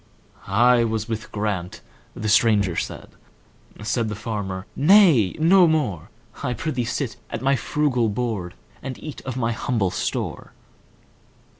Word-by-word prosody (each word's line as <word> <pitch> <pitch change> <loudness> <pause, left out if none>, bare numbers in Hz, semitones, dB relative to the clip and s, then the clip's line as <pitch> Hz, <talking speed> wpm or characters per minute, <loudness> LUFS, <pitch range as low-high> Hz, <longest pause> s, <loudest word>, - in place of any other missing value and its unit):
"I 120 +4 +4
was 110 -2 -2
with 110 -1 -5
Grant"—the 105 0 -5
stranger 105 -4 +3
said; - - -4 0.7
Said 115 +1 -1
the 105 - -4
farmer, 100 -3 -4
"Nay, 155 - +5
no 175 +3 +5
more,—I 120 - -3
prithee 130 -1 -2
sit 120 +1 -3
at - - -5
my 135 +1 +3
frugal 130 -4 0
board, 105 -5 -3 0.3
And 130 -2 -6
eat 155 -3 -8
of 130 -1 -3
my 115 -2 0
humble 115 -4 -1
store. - - -4
115 Hz, 125 wpm, -23 LUFS, 105-135 Hz, 0.7 s, Nay